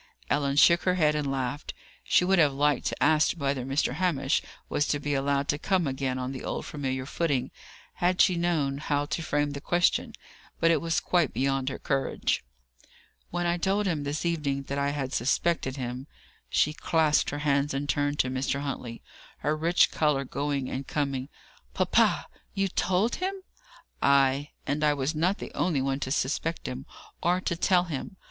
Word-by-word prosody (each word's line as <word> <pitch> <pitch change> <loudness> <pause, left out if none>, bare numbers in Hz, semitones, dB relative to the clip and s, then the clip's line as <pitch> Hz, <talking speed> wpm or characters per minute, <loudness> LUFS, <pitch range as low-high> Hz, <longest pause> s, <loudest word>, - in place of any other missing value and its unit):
Ellen 140 -1 +1
shook 170 +3 +6
her 185 -1 +1
head 155 -4 +3
and 150 -2 -1
laughed. 135 +1 -3 0.3
She 180 - +3
would 190 0 +3
have 150 -4 +4
liked 145 0 +1
to - - -2
ask 155 +1 +4
whether 140 -5 -2
Mr. 135 +3 0
Hamish 150 -7 +1 0.3
was 145 - 0
to 145 - 0
be 145 0 -2
allowed 140 +1 0
to 145 - +1
come 185 -1 +1
again 130 -1 -2
on 130 0 -3
the 130 - -7
old - - -3
familiar 130 -3 -3
footing, 140 -4 -1 0.5
had 180 +1 +1
she 185 - +5
known 160 -5 0
how 145 -1 0
to 150 +3 -3
frame 145 -2 0
the 140 0 -6
question. 175 +3 +1 0.4
But 165 - +4
it 160 - +2
was 165 -1 +1
quite 175 -5 +1
beyond 135 0 0
her 135 - -5
courage. 135 -2 -1 0.9
"When 175 0 -2
I 175 0 +1
told 195 +4 +1
him 165 -6 0
this 145 +3 -3
evening 145 -5 -1
that 140 +1 -3
I 140 0 +1
had 140 -2 -3
suspected 130 +2 0
him 125 +1 -5 0.2
" - - -32
She 150 - +2
clasped 155 -1 +2
her 145 - -4
hands 140 0 +2
and 140 +1 -2
turned 145 0 0
to 130 - -3
Mr. 135 +2 -1
Huntley, 125 -4 -5 0.4
her 150 - +1
rich 165 +3 +3
colour 150 -3 +1
going 140 0 -2
and 135 +1 -5
coming. 140 -2 -2 0.5
"Papa, - - +3 0.3
you 195 0 +1
told 190 +6 +1
him?" 380 +2 -2 0.7
"Ay. 140 +1 +3 0.2
And 145 +2 -1
I 150 -1 +4
was 140 +2 -1
not 175 +6 +1
the - - -8
only 165 -6 0
one 135 +1 -1
to 130 - -3
suspect 155 +4 -1
him, 130 +1 -6 0.3
or 180 +2 +2
to 170 - -1
tell 180 +1 +3
him. 175 +4 -6
145 Hz, 185 wpm, -27 LUFS, 135-165 Hz, 0.9 s, shook